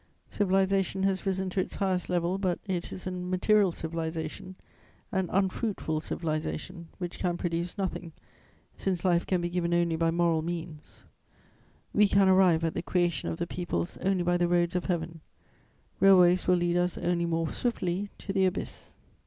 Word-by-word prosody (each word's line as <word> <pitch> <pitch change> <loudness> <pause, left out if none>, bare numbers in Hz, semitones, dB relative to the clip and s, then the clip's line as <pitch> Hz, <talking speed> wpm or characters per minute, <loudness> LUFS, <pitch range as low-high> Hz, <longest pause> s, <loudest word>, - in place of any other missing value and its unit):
Civilization 195 -1 +1
has 195 0 0
risen 190 0 0
to 190 - -1
its 185 - -2
highest 185 -2 -1
level, 175 +1 0
but 185 -3 0
it 185 -4 -3
is 185 - -7
a 185 - -2
material 185 +2 +2
civilization, 160 +2 -5 0.6
an 190 -2 -1
unfruitful 190 -4 -1
civilization, 165 +2 -4
which 175 -2 -6
can 175 -2 0
produce 170 +1 -3
nothing, 185 -3 -3 0.6
since 185 -2 -2
life 175 -2 +2
can 185 -2 +1
be 175 - -1
given 175 -1 0
only 170 -1 +2
by 165 0 +1
moral 165 -1 +2
means; 165 -2 -7 0.9
we 210 0 +5
can 200 -1 +4
arrive 185 -3 +5
at 165 - 0
the - - -2
creation 175 -4 0
of 170 +1 -3
peoples 150 - -3
only 190 -1 0
by 175 0 +2
the 175 0 +2
roads 175 0 +1
of 180 - -1
Heaven: 165 -2 -2 0.8
railways 185 -2 +6
will 180 - +5
lead 175 0 +1
us 180 0 0
only 170 -1 0
more 165 -1 -1
swiftly 200 -5 -2
to 195 - -5
the 190 -1 +3
abyss. 185 - -5
175 Hz, 165 wpm, -28 LUFS, 170-190 Hz, 0.9 s, railways